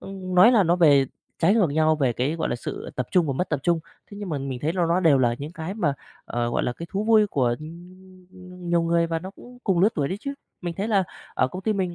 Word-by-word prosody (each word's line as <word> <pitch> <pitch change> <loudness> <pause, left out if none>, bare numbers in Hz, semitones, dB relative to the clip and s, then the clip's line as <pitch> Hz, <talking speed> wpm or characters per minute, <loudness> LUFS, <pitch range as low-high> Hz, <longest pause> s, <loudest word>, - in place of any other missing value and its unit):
ưm, 195 0 -9
ưm, 185 0 -4
nói 220 +8 +7
là 215 -4 +5
nó 175 +1 +2
về 145 -6 +5 0.3
trái 185 +6 +4
ngược 190 -10 +3
nhau 155 +1 +2
về 130 -5 +1
cái, 135 +7 -1
gọi 165 - -2
là, 120 - -1
sự - - -6
tập 125 - -2
trung 175 -4 +3
và 140 - 0
mất 180 +7 -2
tập 150 -3 -1
trung. 170 -2 +1 0.3
Thế 200 - -10
nhưng 205 -2 -6
mà 150 -3 -2
mình 135 -2 -4
thấy 155 +2 0
ló 180 -1 +1
ló 170 +2 +2
đều 155 -6 +5
là 120 -2 +2
những 150 +4 -7
cái 175 +3 -5
mà, 160 -10 0 0.3
ờ, 120 0 -2
gọi - - 0
là, 125 - -1
cái 170 +7 -8
thú 200 +2 -2
vui 220 -2 +5
của, 125 -9 +1
ưm, 180 +2 -12
nhiều 170 -1 +3
người 170 0 +2
và 165 0 -2
nó 185 +3 -8
cũng 245 +4 -15
cùng 185 -4 +2
lứa 205 - +6
tuổi 140 -3 -1
đấy 190 - -3
chứ. 280 0 -5 0.3
Mình 175 -2 -4
thấy 200 +5 -3
là 195 -4 +3 0.3
ở 130 - +2
công 185 +5 -7
ty 220 - +1
mình 185 -4 -2
170 Hz, 285 wpm, -24 LUFS, 150-190 Hz, 0.3 s, nói